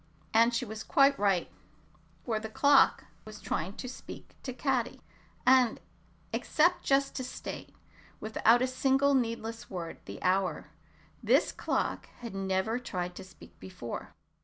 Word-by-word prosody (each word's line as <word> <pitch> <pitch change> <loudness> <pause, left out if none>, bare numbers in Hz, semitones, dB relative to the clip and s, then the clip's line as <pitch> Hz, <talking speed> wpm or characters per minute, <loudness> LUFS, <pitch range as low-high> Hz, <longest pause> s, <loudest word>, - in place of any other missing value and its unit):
And 230 +2 +5
she 240 +1 -1
was 220 0 -7
quite 275 0 +4
right, 195 -4 +2 0.8
for 220 -2 0
the 220 0 -6
clock 280 +5 +4 0.2
was 215 -1 -10
trying 180 +5 -3
to 255 - -6
speak 255 - -10
to 260 - -5
Caddy, 255 -1 -1 0.5
and 255 -3 +5 0.5
except 345 +3 +2
just 275 0 +2
to 260 - -2
state, 250 - -7 0.4
without 225 +2 +3
a - - +2
single 270 +2 +2
needless 230 -2 -2
word, 175 -4 -6
the - - -8
hour, 185 +1 0 0.5
this - - +3
clock - - -2
had 235 -3 -6
never 195 +4 -1
tried 180 -7 -4
to 190 - -7
speak 185 - -16
before. 180 -11 -7
230 Hz, 140 wpm, -30 LUFS, 195-260 Hz, 0.8 s, And